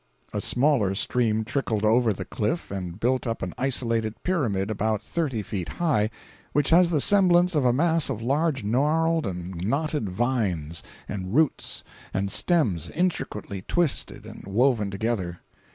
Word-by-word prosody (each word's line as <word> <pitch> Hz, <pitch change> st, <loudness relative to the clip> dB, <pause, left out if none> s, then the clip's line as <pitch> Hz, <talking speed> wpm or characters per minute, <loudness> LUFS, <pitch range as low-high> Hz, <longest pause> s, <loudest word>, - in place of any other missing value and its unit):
A -, -, -1 dB
smaller 125 Hz, -8 st, +2 dB
stream 110 Hz, 0 st, +1 dB
trickled 110 Hz, -4 st, -1 dB
over 115 Hz, +1 st, +4 dB
the 100 Hz, -, -5 dB
cliff 110 Hz, -, -2 dB
and 90 Hz, -2 st, -5 dB
built 125 Hz, +2 st, 0 dB
up 115 Hz, -, -3 dB
an 90 Hz, -, -4 dB
isolated 115 Hz, -4 st, 0 dB
pyramid 110 Hz, -, 0 dB
about 110 Hz, 0 st, -1 dB
thirty 135 Hz, -10 st, -2 dB
feet 95 Hz, -4 st, -4 dB
high, 135 Hz, -12 st, +2 dB, 0.4 s
which 145 Hz, 0 st, +2 dB
has 175 Hz, +1 st, +6 dB
the 160 Hz, -4 st, +1 dB
semblance 180 Hz, 0 st, +5 dB
of 145 Hz, -4 st, +1 dB
a 125 Hz, -, +5 dB
mass 160 Hz, +4 st, +2 dB
of 130 Hz, -6 st, -3 dB
large 140 Hz, +1 st, 0 dB
gnarled 155 Hz, +7 st, +1 dB
and 90 Hz, 0 st, -5 dB
knotted 145 Hz, 0 st, -1 dB
vines 95 Hz, -, -1 dB, 0.3 s
and 95 Hz, +1 st, -4 dB
roots 155 Hz, -1 st, 0 dB, 0.3 s
and 100 Hz, +1 st, -1 dB
stems 120 Hz, -, +1 dB
intricately 130 Hz, -, -2 dB
twisted 170 Hz, -, -2 dB
and -, -, -10 dB
woven 110 Hz, 0 st, +2 dB
together. 100 Hz, -4 st, -3 dB
120 Hz, 150 wpm, -25 LUFS, 100-150 Hz, 0.4 s, has